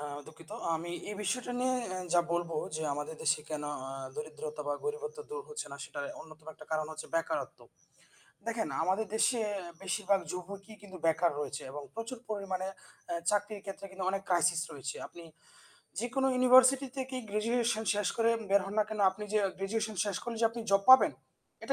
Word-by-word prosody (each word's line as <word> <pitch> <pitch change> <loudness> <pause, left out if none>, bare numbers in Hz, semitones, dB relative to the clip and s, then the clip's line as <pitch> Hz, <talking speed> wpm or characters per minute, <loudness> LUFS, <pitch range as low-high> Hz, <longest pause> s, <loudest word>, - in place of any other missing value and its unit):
আ - - -5 0.2
দুঃখিত 160 0 -14 0.2
আমি 165 +2 -3 0.2
এই - - -3
বিষয়টা 245 +5 -1
নিয়ে 255 0 +3 0.2
আ - - -2 0.2
যা 175 - +8
বলবো 170 -1 0 0.2
যে, - - -3
আমাদের 150 +2 -4
দেশে 160 -2 +3
কেন 150 -1 -2 0.3
আ - - -5 0.2
দরিদ্রতা 150 0 -5
বা 145 - +1
গরিবত্ব 455 +1 -3
দূর 470 +1 -4
হচ্ছে 450 0 -5
না, - - -5
সেটার 145 - -5 0.2
অন্যতম 155 -1 -13
একটা - - -13
কারণ 155 -1 +1
হচ্ছে 155 - -7
বেকারত্ব। 165 0 -1 0.9
দেখেন 230 -8 0
আমাদের 190 +6 +2
দেশে 235 +2 +3 0.4
বেশিরভাগ 195 0 +2
যুবকই 195 +4 -6
কিন্তু 190 -2 -10
বেকার 165 +1 +4
রয়েছে 145 -3 -3
এবং 145 +2 -6
প্রচুর 230 +2 -5
পরিমাণে 190 -3 -2 0.4
এ - - +1 0.2
চাকরির 205 0 0
ক্ষেত্রে 195 0 -6
কিন্তু 190 -1 -4
অনেক 195 0 -1
ক্রাইসিস 175 -2 +4
রয়েছে। 140 0 -5
আপনি 170 -1 -12 0.7
যেকোনো 260 +4 +1
ইউনিভার্সিটি 255 +2 +7
থেকেই 260 -1 -3
গ্র্যাজুয়েশন 225 +1 +1
শেষ 205 -2 +1
করে 230 0 +4 0.2
বের 200 0 +6
হন 195 - -5
না 215 - +5
কেনো 215 -1 -1
আপনি 210 +3 -7
যে 215 - +4 0.2
গ্র্যাজুয়েশন 215 +3 -1
শেষ 205 -2 -1
করলে 235 -1 -3
যে - - +8
আপনি 230 +1 -5
জব 195 0 +5
পাবেন, 260 - +10 0.5
এটা - - 0
200 Hz, 180 wpm, -32 LUFS, 165-230 Hz, 0.9 s, পাবেন